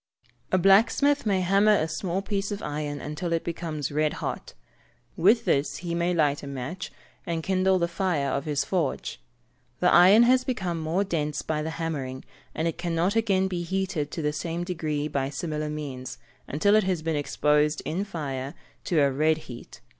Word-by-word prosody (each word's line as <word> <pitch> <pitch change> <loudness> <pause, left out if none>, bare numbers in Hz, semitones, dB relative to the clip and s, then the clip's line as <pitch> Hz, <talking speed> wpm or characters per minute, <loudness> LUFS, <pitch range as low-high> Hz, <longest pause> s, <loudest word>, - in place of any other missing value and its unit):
A 185 - +4
blacksmith 225 +9 +4
may 195 -2 +2
hammer 200 +3 +4
a 160 -5 +1
small 180 +4 -2
piece 200 0 -2
of 205 0 -4
iron 145 -1 -3
until 160 +4 -4
it 165 -1 0
becomes 160 -4 -4
red 150 +1 +1
hot. - - -5 0.6
With 205 +8 +4
this 140 -1 +1
he 170 - -2
may 170 +1 +1
light 150 -4 +1
a 140 - -8
match, 140 +7 -5 0.4
and 165 -1 -2
kindle 190 0 +2
the 170 -1 +1
fire 170 -6 -1
of 140 +3 -2
his 145 -2 0
forge. 155 - -2 0.6
The - - +3
iron 190 +6 +8
has 255 +1 +4
become 190 -10 -2
more 160 +5 0
dense 150 -6 -2
by 155 -1 -1
the 155 - -3
hammering, 140 -6 -4 0.3
and 160 - 0
it 165 - -3
cannot 175 +3 0
again 195 -4 +2
be 180 -2 -3
heated 180 -4 -2
to 160 - -5
the 150 0 0
same 170 +2 -3
degree 155 -4 -2
by 140 -3 -1
similar 150 +1 -3
means, 135 -4 -6 0.3
until 180 +8 +2
it 215 0 +5
has 180 -4 -1
been 165 -1 -1
exposed 150 +1 +1
in 180 +5 -1
fire, 140 -8 -5 0.3
to 165 -4 +2
a 140 -1 +3
red 155 +3 +2
heat. 125 -6 -11
165 Hz, 185 wpm, -26 LUFS, 150-190 Hz, 0.6 s, iron